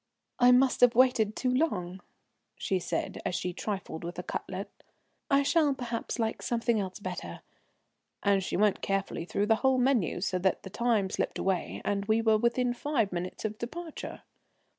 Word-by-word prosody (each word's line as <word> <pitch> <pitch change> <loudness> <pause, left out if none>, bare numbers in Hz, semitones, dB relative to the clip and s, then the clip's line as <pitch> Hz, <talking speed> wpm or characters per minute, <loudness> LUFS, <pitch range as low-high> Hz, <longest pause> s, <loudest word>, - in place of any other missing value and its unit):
"I 245 0 +7
must 255 +1 +4
have 245 -2 +6
waited 230 -4 +4
too 255 - 0
long," 190 - -1 0.5
she 190 - -1
said, - - -3
as 180 - -2
she 180 0 -2
trifled 190 -4 -4
with 175 +1 -6
a - - -4
cutlet. - - -5 0.6
"I 280 -1 +4
shall 295 -1 +3
perhaps 240 -3 -4
like 225 -2 -1
something 235 -1 0
else 190 -2 -4
better," 185 -3 -6 0.8
and 200 -1 +3
she - - -2
went 210 0 +2
carefully 195 -4 -2
through 200 +3 0
the 220 +1 +3
whole 265 +1 +3
menu, 250 - +2
so 185 0 -1
that 190 +1 0
the 190 - -8
time 225 -5 +1
slipped - - -2
away, 190 -2 -2
and 200 0 0
we 220 +1 +3
were 220 -1 +3
within 240 +1 +1
five 245 -5 0
minutes 180 +4 -4
of 215 0 -3
departure. 325 +7 -7
220 Hz, 175 wpm, -29 LUFS, 190-250 Hz, 0.8 s, I